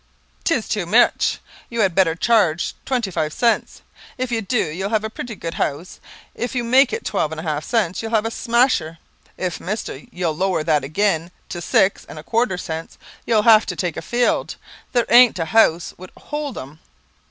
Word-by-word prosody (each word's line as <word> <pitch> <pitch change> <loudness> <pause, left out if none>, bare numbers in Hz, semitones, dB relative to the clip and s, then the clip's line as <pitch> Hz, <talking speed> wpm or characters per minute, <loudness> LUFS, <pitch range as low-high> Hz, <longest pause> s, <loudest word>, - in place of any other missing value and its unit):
"Tis 270 -10 0
tew 195 -6 -2
much. 230 +7 +3 0.3
You 235 -1 -1
had 190 -4 +2
better 165 -3 +3
chearge 180 -5 +2
twenty 240 -7 -1
five 155 -3 -1
cents. 235 +7 0 0.3
If 255 -1 -3
you 230 -1 0
dew, 220 +1 0
you'll 185 +6 -4
have 215 -1 0
a 220 - -4
pretty 235 0 -6
good 165 -3 -6
house. 155 +6 -3 0.3
If 245 +2 -4
you 245 - 0
make 255 +3 +4
it 455 - -4
twelve 155 - -1
and 160 - -5
a - - -6
half 155 -2 -2
cents, 200 -7 0
you'll 225 - -5
have 215 0 +2
a 225 - -2
smasher. 235 -10 +1 0.4
If, 180 -2 -3
mister, 195 -7 -5
you'll 175 -3 -2
lower 185 -1 0
that 155 -3 +1
agin 170 +2 0 0.2
to 175 - -5
six 190 +3 +2
and - - -9
a 155 - -8
quarter 225 -2 0
cents, 165 -2 -6 0.3
you'll 220 -3 +3
have 220 -1 +6
to - - -3
take 175 -4 -2
a - - -5
field, 240 0 0 0.4
there 240 -2 +2
ain't 245 -2 +6
a 165 - -1
house 170 -3 +3
would 185 0 -10
hold 295 -2 -5
'em." 140 +4 -9
195 Hz, 200 wpm, -21 LUFS, 165-235 Hz, 0.4 s, have